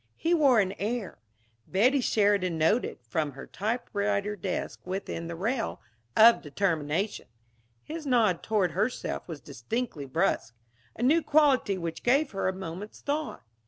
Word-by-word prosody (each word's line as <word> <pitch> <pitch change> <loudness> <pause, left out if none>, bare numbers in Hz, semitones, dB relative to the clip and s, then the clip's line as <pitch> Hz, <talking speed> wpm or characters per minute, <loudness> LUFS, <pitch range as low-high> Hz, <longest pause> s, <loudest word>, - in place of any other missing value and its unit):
He 335 - 0
wore 280 -8 +5
an 190 -2 +1
air 215 -1 -3 0.5
Betty 255 +9 +3
Sheridan 200 -7 +2
noted, 165 +10 +1
from 145 +5 -1
her 135 - -9
typewriter 205 -2 -2
desk 185 -1 -4
within 185 -2 -4
the 170 - -5
rail 225 +7 -2 0.4
of 230 +2 +8
determination. 160 +3 -1 0.6
His 315 -1 -6
nod 220 -9 +3
toward 205 -6 +1
herself 210 +9 -2
was 160 -4 -7
distinctly 145 - -4
brusque; 130 -6 0 0.4
a - - -4
new 310 +7 +4
quality 285 -10 +3
which 170 -2 -5
gave 275 +4 +2
her 195 -2 -1
a - - +2
moment's 190 +2 -7
thought. 300 +2 -3
205 Hz, 140 wpm, -28 LUFS, 170-245 Hz, 0.6 s, of